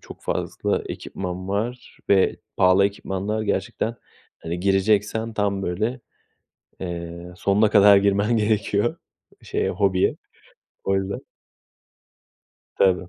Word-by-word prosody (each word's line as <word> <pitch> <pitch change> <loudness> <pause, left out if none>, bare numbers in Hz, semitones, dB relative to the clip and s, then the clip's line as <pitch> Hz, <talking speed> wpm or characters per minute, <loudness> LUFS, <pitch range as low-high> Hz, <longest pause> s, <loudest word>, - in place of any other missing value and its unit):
çok - - -13
fazla - - -1
ekipman 95 0 -5
var 120 +5 -3
ve 95 -1 +4 0.2
pahalı 95 +2 +5
ekipmanlar 100 +2 -3
gerçekten. 115 +2 -1 0.4
Hani, 85 +2 -5
gireceksen 105 +3 +1
tam, 100 -2 0
böyle, 110 +9 -2 0.8
eee, 85 -1 -6
sonuna 100 +3 +2
kadar 100 -1 +7
girmen 100 +3 +2
gerekiyor 105 +1 +1 0.5
şeye, - - -1
hobiye. 95 -2 +2 0.7
Öyle. 95 0 0 1.6
Tabii. 90 -2 +2
100 Hz, 95 wpm, -23 LUFS, 95-105 Hz, 1.6 s, kadar